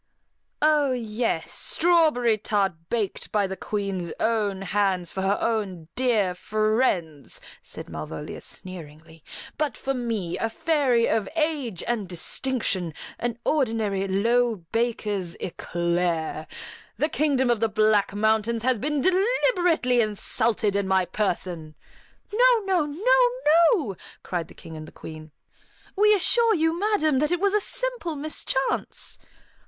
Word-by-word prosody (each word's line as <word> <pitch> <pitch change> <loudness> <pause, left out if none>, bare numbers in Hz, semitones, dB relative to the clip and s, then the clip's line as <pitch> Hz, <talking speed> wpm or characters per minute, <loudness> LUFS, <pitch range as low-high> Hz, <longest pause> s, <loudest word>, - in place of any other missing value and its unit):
"Oh 300 -3 +4
yes, 230 -1 -2
strawberry 315 -9 +3
tart 200 -2 0 0.2
baked 220 -5 -2
by 205 -2 +2
the 190 0 -4
Queen's 195 -5 -3
own 210 -4 0
hands 190 -3 0
for 190 - -4
her 195 +2 +1
own 195 -8 -2
dear 225 -8 +2
friends," 205 - -1 0.2
said - - -8
Malvolia 80 -1 -7
sneeringly; 160 -3 -8 0.4
"but 300 -3 -1
for 270 - -2
me, 230 -9 -3
a 225 - 0
fairy 270 -4 +2
of 215 -3 0
age 300 - -1
and 220 -6 -2
distinction, 185 - -2 0.2
an 235 -1 -2
ordinary, 220 -9 0
low 230 +5 +2 0.2
baker's 210 -6 -1
eclair. 170 -3 -2 0.5
The 300 - +2
Kingdom 275 -5 +1
of 235 - +1
the 225 0 +1
Black 215 -1 +3
Mountains 220 +2 +1
has 255 -2 +2
been 295 +2 -1
deliberately 360 - +2
insulted 215 0 +1
in 200 -1 0
my 190 -1 +2
person!" 175 -5 -3 0.6
"No, 485 +1 +5
no, 370 -5 +2
no, - - +3 0.5
no!" 230 - -3 0.3
cried 175 -3 -3
the - - -16
King 160 - -11
and 155 0 -8
the - - -12
Queen. 155 0 -10 0.7
"We 425 +1 +5
assure 450 +4 +4
you, 325 0 +1
madam, 375 -9 +2
that 300 +3 +1
it 355 - +1
was 400 +1 +2
a 420 - +4
simple 485 -6 0
mischance." 280 -2 -2
225 Hz, 130 wpm, -25 LUFS, 190-300 Hz, 0.7 s, No